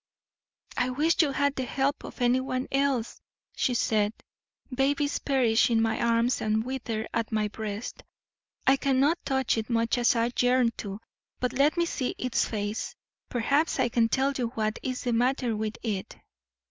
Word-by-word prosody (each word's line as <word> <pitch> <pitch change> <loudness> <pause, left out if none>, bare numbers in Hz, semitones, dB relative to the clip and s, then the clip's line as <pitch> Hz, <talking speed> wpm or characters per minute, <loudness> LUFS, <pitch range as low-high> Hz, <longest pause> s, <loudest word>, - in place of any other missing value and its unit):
"'I 250 +1 +1
wish 305 +7 +2
you 305 - +2
had 285 +1 +1
the 260 - -3
help 275 +3 -1
of - - -9
anyone 255 +1 +1
else,' 270 -4 0 0.3
said 220 -4 +1 0.5
she. 255 - -9
'Babies 285 +2 +1
perish 250 -5 +3
in 230 -1 +3
my 225 0 +1
arms 235 +1 +2
and 220 +1 0
wither 240 -4 -3
at 230 0 -1
my 215 -1 +1
breast. 210 +1 -6 0.6
I 270 +1 +5
cannot 275 +4 +2
touch 265 -4 +1
it, 220 - -5
much 230 +1 +1
as 245 +2 +3
I 230 +1 +1
yearn 250 -1 +3
to. 200 -1 -6 0.4
But 250 0 -1
let 280 +5 +3
me 340 - +3
see 260 -6 -2
its 255 -1 0
face; 210 0 -3 0.3
perhaps 280 +7 +1
I 245 - +2
can 230 -1 +2
tell 270 +3 +2
you 245 -3 -1
what 215 -1 -1
is 255 -1 -3
the 245 - 0
matter 245 0 +1
with 215 0 -3
it.' 205 -5 -3
245 Hz, 170 wpm, -27 LUFS, 225-270 Hz, 0.6 s, I